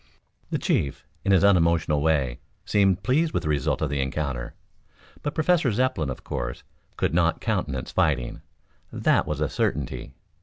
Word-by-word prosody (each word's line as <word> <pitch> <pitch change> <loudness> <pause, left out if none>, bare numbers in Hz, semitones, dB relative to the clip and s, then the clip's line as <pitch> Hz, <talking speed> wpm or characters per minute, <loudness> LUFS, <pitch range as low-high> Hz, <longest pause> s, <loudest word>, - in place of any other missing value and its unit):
The - - 0
chief, 70 - -1 0.2
in 100 - +1
his 95 -4 +5
unemotional 85 -6 +3
way, 70 -6 +1 0.3
seemed 95 -2 +2
pleased 155 +9 +2
with - - 0
the 75 - -2
result 75 0 0
of 75 - -1
the 70 -1 0
encounter. 65 -3 -3 0.7
But 145 - -3
Professor 160 -4 +3
Zepplin, 105 - 0
of 65 - -6
course, - - -4 0.3
could - - 0
not 85 -1 +2
countenance 85 - -2
fighting. 70 -6 0 0.5
That - - +2
was 75 -1 -2
a 75 - +2
certainty. 65 - -2
80 Hz, 155 wpm, -25 LUFS, 70-100 Hz, 0.7 s, his